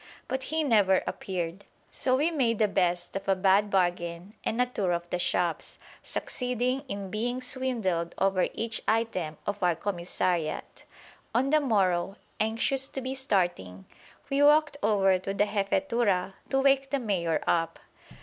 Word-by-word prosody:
But 265 0 -3
he 315 0 0
never 205 -8 +4
appeared. 180 0 -4 0.3
So 255 -1 +1
we 300 +6 +1
made 245 -8 +1
the 215 - +3
best 180 -3 0
of 195 0 -4
a 195 - +4
bad 195 +2 +3
bargain 175 0 -1
and 230 - -2
a 250 - +4
tour 200 -7 -1
of 170 0 -3
the 180 - -1
shops, 175 -1 -1 0.2
succeeding 250 +1 -2
in 200 -5 -5
being 245 +4 -1
swindled 235 -10 -1
over 195 -2 +2
each 225 0 -2
item 185 -9 0
of 205 0 -3
our 175 -2 +3
commissariat. 175 -3 -2 0.5
On 265 +4 +2
the 310 - +5
morrow, 195 -8 +1 0.2
anxious 230 +5 +1
to 270 - -6
be 260 +1 -3
starting, 175 - -1 0.4
we 275 0 +1
walked 295 0 +5
over 195 -3 +3
to 195 +2 -4
the 205 - +3
Jefetura 200 -1 0 0.2
to 270 - +2
wake 270 0 +3
the 280 - +1
Mayor 180 - 0
up. 165 -1 +1
200 Hz, 155 wpm, -28 LUFS, 180-250 Hz, 0.5 s, the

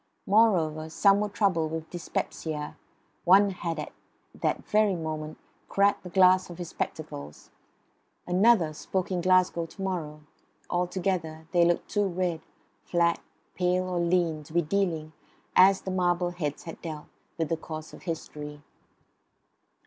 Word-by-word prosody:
Moreover, 170 -8 +3
some 200 +4 +4
were 210 0 -1
troubled 185 -6 +1
with 160 0 -5
dyspepsia; 155 -3 -4 0.5
one 195 +3 +6
had 170 -3 -4
at 150 - -5 0.4
that - - -2
very 210 -2 +3
moment 155 -2 -5 0.3
cracked 200 0 +3
the 180 - -9
glass 185 0 +5
of 175 - -9
his 175 -2 -6
spectacles; 70 +1 -6 0.7
another 180 -3 +4
spoke 185 +4 -3
in 180 -1 0
Glasgow 185 -2 +3
to 195 - -19
morrow; 160 -5 -3 0.5
altogether 175 -3 -1
they 175 -2 +4
looked 175 0 +1
too 205 -1 +1
red, 175 -3 -1 0.4
fat, 170 -1 +2 0.3
pale 180 0 +1
or 180 -1 -1
lean, 170 -2 +1
to 155 - -14
be 175 0 +3
dealing, 160 -3 -1 0.4
as 190 +1 +6
the 190 - -4
marble 175 -1 +1
heads 150 -5 -4
had 165 - -9
dealt, 155 -3 -6 0.3
with 165 -2 -1
the 165 - +1
course 155 -1 -8
of - - -11
history. 150 -3 -6
175 Hz, 140 wpm, -28 LUFS, 160-185 Hz, 0.7 s, one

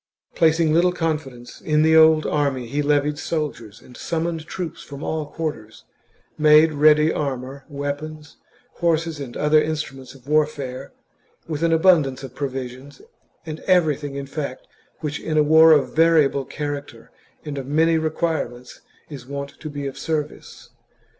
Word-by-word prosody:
Placing 160 -1 +3
little 175 +2 +3
confidence 150 -8 -4
in 155 0 +2
the 160 0 +4
old 160 -1 +6
army, 140 -4 0
he 140 +5 -2
levied 145 0 +1
soldiers 120 -10 -4
and 125 - -16
summoned 165 +1 -3
troops 175 -4 -6
from 140 +1 -9
all 155 -2 -3
quarters; 150 -9 -6 0.6
made 155 +1 +6
ready 150 +1 +4
armour, 135 -1 -4
weapons, 145 +1 -6 0.4
horses, 165 -2 0
and 130 -4 -7
the - - -6
other 150 +1 +4
instruments 135 -4 -5
of 130 0 -18
warfare, 145 -3 -1 0.6
with 155 -2 -4
an 165 0 +2
abun 165 +1 +5
dance 135 0 -7
of 130 -2 -8
provisions, 130 0 -6 0.4
and 155 -1 -6
everything 150 -6 +2
in 140 0 -4
fact 140 -2 -6 0.4
which 150 -1 -3
in 155 -1 -2
a 150 - +5
war 160 +2 +7
of 150 -3 +3
variable 155 -4 +3
character 145 -6 -6 0.3
and 145 -2 -4
of 130 - -7
many 160 +3 +2
requirements, 155 -6 -3 0.3
is 135 -5 -10
wont 140 0 -5
to 155 - -7
be 145 -1 -6
of 135 - -6
service. 155 -2 -5
150 Hz, 155 wpm, -22 LUFS, 140-160 Hz, 0.6 s, war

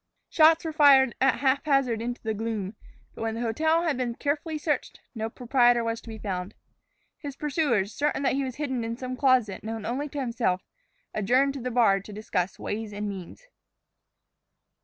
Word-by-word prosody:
Shots 320 +1 +5
were 320 - -3
fired 275 -5 +6
at 265 +1 +3
haphazard 275 -4 +2
into 240 +1 -4
the 220 -1 -1
gloom. 215 -2 -3 0.4
But - - -10
when 225 0 -2
the 230 - -4
hotel 315 +9 +1
had 315 -6 0
been 245 -2 -2
carefully 305 +3 -2
searched, 295 -2 -2
no 220 -1 -3
proprietor 245 0 +3
was 230 0 -2
to - - -12
be 220 - -7
found. 190 -1 -4 0.6
His 285 -4 -7
pursuers, 275 - 0
certain 290 -1 -1
that 265 - +2
he 275 +1 0
was 260 -2 -4
hidden 265 -5 -2
in 230 +1 -4
some 255 0 -5
closet 255 -7 +2
known 220 -1 -5
only 275 +5 -2
to 285 - -5
himself, 230 -8 -1 0.5
adjourned 255 +7 +2
to 275 - -6
the 250 - -2
bar 225 -5 +4
to 195 - -12
discuss 200 -3 -2
ways 210 0 -4
and 205 +1 -3
means. 195 - -8
245 Hz, 180 wpm, -27 LUFS, 220-280 Hz, 0.6 s, fired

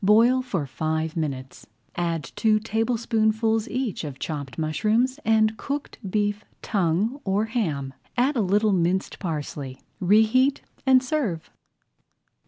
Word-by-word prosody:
Boil 230 +6 +5
for 190 - -2
five 155 +3 -2
minutes, 135 -5 -4 0.3
add 170 -3 -1
two 215 -1 +3
tablespoonfuls 225 0 +1
each 255 -8 -2
of 145 -4 -6
chopped 140 -3 -5
mushrooms 215 - +1
and 220 0 +3
cooked 285 +1 -4
beef 205 +1 0 0.2
tongue 205 - 0
or 200 +2 +1
ham. 160 - -2 0.2
Add 265 +4 +2
a 235 - +2
little 205 +2 +2
minced 185 +1 0
parsley, 145 -6 -4 0.2
reheat, 220 +8 +4 0.2
and 260 -1 +6
serve. 250 - -2
210 Hz, 120 wpm, -25 LUFS, 160-230 Hz, 0.3 s, and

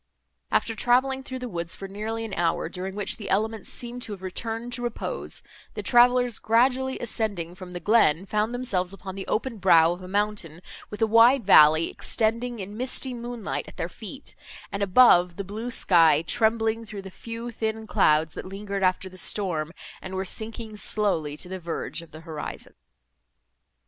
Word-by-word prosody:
After 225 - +1
travelling 260 +4 +2
through 260 -1 -7
the 250 -1 -5
woods 170 -5 -4
for 195 - -7
nearly 220 +3 -4
an 215 - -7
hour, 165 -2 0
during 190 +2 -5
which 205 -1 +1
the 200 -4 -7
elements 220 +2 -1
seemed 245 0 -2
to 215 - -5
have 190 -2 -10
returned 225 +5 -4
to 245 - -2
repose, 245 - -4 0.3
the - - -4
travellers, 245 -1 +4
gradually 255 +3 +2
ascending 205 -7 -2
from 180 -1 -10
the 175 - -4
glen, 185 -3 +3
found 210 +3 0
themselves 200 -7 -1
upon 195 -1 -8
the 195 0 -7
open 230 -1 -2
brow 170 -3 +5
of 175 +1 -5
a 185 - -9
mountain, 200 -4 -2 0.3
with 210 +2 -3
a - - +6
wide 230 +2 +5
valley, 155 -3 +7
extending 230 +2 -1
in 205 0 -7
misty 255 +2 -1
moonlight, 240 -2 -5
at - - -13
their - - -2
feet, - - -9 0.4
and 200 - -4
above, 185 -4 +5
the 200 - -4
blue 215 +5 -5
sky, 165 -9 +4
trembling 225 +1 +1
through 210 -3 -8
the 190 - -9
few 230 +4 -7
thin 220 -1 -3
clouds, 155 -5 +2
that - - -6
lingered 200 +1 -5
after 185 0 +1
the 185 0 -12
storm, 165 -7 0 0.3
and 190 0 -7
were 190 +1 -2
sinking 220 +2 -5
slowly 190 -8 +1
to - - +4
the 190 +1 -6
verge 170 0 -4
of 170 - -15
the 155 - -11
horizon. 160 -2 -7
210 Hz, 180 wpm, -25 LUFS, 185-230 Hz, 0.4 s, valley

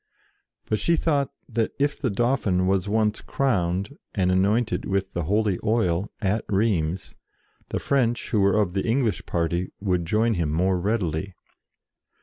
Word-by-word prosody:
But 110 - -1
she 170 - +3
thought 145 -4 +1 0.2
that 115 -1 -1
if 145 +1 +1
the 130 - 0
Dauphin 105 -5 +1
was 95 +1 +1
once 110 0 +1
crowned, 100 - -1 0.2
and 90 -3 +2
anointed 105 +5 +1
with 95 0 -1
the 85 -3 -2
holy 105 +1 +1
oil, 100 -4 +1
at 105 +1 0
Rheims, 95 -5 0 0.6
the - - -2
French 120 -4 0
who 110 - +2
were 100 +2 +3
of 100 -4 +1
the 95 - 0
English 115 -2 +1
party 85 +1 -1
would 90 -4 0
join 110 +5 +2
him 85 -6 -1
more 90 +3 +1
readily. 95 -2 -1
100 Hz, 150 wpm, -25 LUFS, 90-115 Hz, 0.6 s, she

